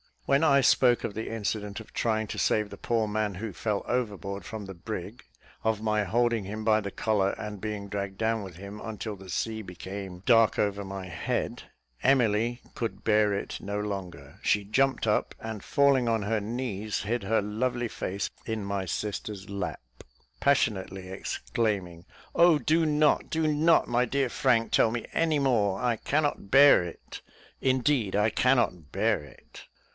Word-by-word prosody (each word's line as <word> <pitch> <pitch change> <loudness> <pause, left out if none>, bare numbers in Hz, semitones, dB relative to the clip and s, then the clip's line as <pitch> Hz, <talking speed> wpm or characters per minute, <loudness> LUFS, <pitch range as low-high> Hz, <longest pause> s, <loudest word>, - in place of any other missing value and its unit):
When 140 +2 +3
I 140 -2 +5
spoke 125 -1 +4
of 105 - -3
the 110 +2 -4
incident 105 -2 -3
of 110 - -13
trying 110 -1 0
to - - -5
save 105 -1 +1
the 100 - -9
poor 115 +1 0
man 105 -1 -1
who 105 +3 -5
fell 105 +2 -2
overboard 100 -6 -3
from 110 +2 -6
the 95 - -7
brig 100 +4 -7 0.4
of 110 -1 0
my 105 -1 +1
holding 115 +1 +1
him 110 +3 -5
by 110 -1 +4
the 100 -2 -4
collar, 100 -1 +1
and 105 -1 -6
being 105 -2 -4
dragged 100 -1 -4
down 115 0 0
with 95 -4 -8
him 100 +3 -9
until 110 -2 -5
the 95 0 -12
sea 110 +6 -2
became 95 0 -7
dark 115 -2 +5
over 100 -1 0
my 95 -1 -6
head 90 - -3 0.4
Emily 120 -2 +2
could 115 -2 -4
bear 105 -1 +3
it 100 - -4
no 100 +1 -3
longer; 90 -9 -6
she 105 - +2
jumped 135 +7 +1
up, 105 - +1
and 110 -2 -6
falling 140 -4 +3
on 115 -2 +1
her 110 +2 0
knees, 110 -2 -3
hid 115 +3 -2
her 110 +3 +2
lovely 120 +3 -1
face 100 -1 -3 0.2
in 110 -2 -3
my 100 -1 -2
sister's 100 +2 -4
lap, 95 -6 -4 0.6
passionately 95 -8 +1
exclaiming, 95 -3 -2 0.3
"Oh, 170 -2 +6
do 160 +2 +2
not, 150 0 +2
do 160 -1 0
not, 155 +2 +4
my 120 +1 +2
dear 135 +1 0
Frank, 120 -4 +2
tell - - +4
me 120 0 -3
any 160 -2 +2
more 110 -8 +2
I 120 -2 +1
cannot 145 -5 -1
bear 135 -4 +7
it 85 - -9 0.4
indeed, 130 -5 +1
I 105 +2 +3
cannot 115 - +1
bear - - +1
it." 70 -3 -15
110 Hz, 170 wpm, -28 LUFS, 100-120 Hz, 0.6 s, bear